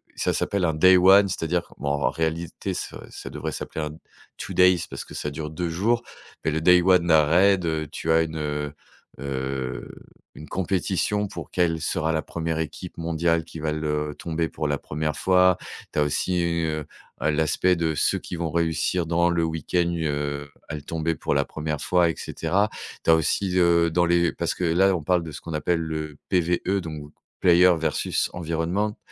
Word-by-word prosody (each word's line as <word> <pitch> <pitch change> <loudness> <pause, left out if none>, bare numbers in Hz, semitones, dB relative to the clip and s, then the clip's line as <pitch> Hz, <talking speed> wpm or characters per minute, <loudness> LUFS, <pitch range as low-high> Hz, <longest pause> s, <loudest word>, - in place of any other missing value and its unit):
Ça - - 0
s'appelle 100 -3 0
un 80 - +1
day 95 +4 +6
one, 95 +2 +7
c'est-à-dire 85 -1 -1
que - - -18
bon, 70 - -2
en 70 -4 +1
réalité, 80 +1 -3
ça - - -6
ça - - -8
devrait - - -4
s'appeler 80 - -5
un 75 +1 -7 0.4
two - - -6
days, 90 -2 +5
parce - - -7
que - - -11
ça 75 - -3
dure 75 +1 -5
2 85 +3 -3
jours, 110 +8 +1 0.4
mais 80 - +2
le 80 - -1
day 90 +2 +6
one 90 -2 +4
d'un 80 -2 +5
raid, 90 +3 +4
heu, 80 -2 -1
tu 80 - -2
as 80 0 +5
une, 80 -1 -3
heu 75 -1 -3 0.5
heu, 65 -1 -4 0.5
une 75 - -10
compétition 95 +2 0
pour - - -8
quelle 85 -3 +1
sera 80 +2 0
la 80 -1 0
1re 80 -1 -3
équipe 80 +3 -6
mondiale 85 0 0
qui 80 0 -10
va 75 0 -1
le 75 -1 -2
tomber 80 -1 -2
pour 75 - -3
la 75 0 0
1re 75 +1 -3
fois. 90 +1 +4 0.4
Tu - - 0
as - - +4
aussi, 85 +5 0
heu, 80 -3 -1 0.4
heu, 80 - +3
l'aspect 80 +4 +2
de 80 -2 -1
ceux - - +1
qui - - -7
vont 85 -2 -3
réussir 85 +1 0
dans 85 +1 +2
le 85 -1 +1
week-end, 80 +2 0
heu, 70 -2 -2 0.2
à 80 - -5
le 75 - -6
tomber 80 +1 -2
pour - - -2
la 70 -1 +2
1re 75 -1 -4
fois, 90 0 +3
et - - 0
cetera. 95 +6 0 0.3
Tu - - -1
as 80 - +8
aussi, 90 +4 0
heu, 85 -1 +4
dans 85 +2 +2
les 85 0 +3
parce - - -2
que - - -5
là, 90 +3 +3
on 85 - -3
parle 90 +2 +2
de 80 - -7
ce 75 - -9
qu'on 85 - -7
appelle 80 +3 0
le 80 -2 -4
PvE, 90 +2 +1
donc, 75 -3 -7 0.3
player 90 0 +6
versus 80 -1 -1
environment, 85 +5 -1
80 Hz, 200 wpm, -24 LUFS, 75-90 Hz, 0.5 s, as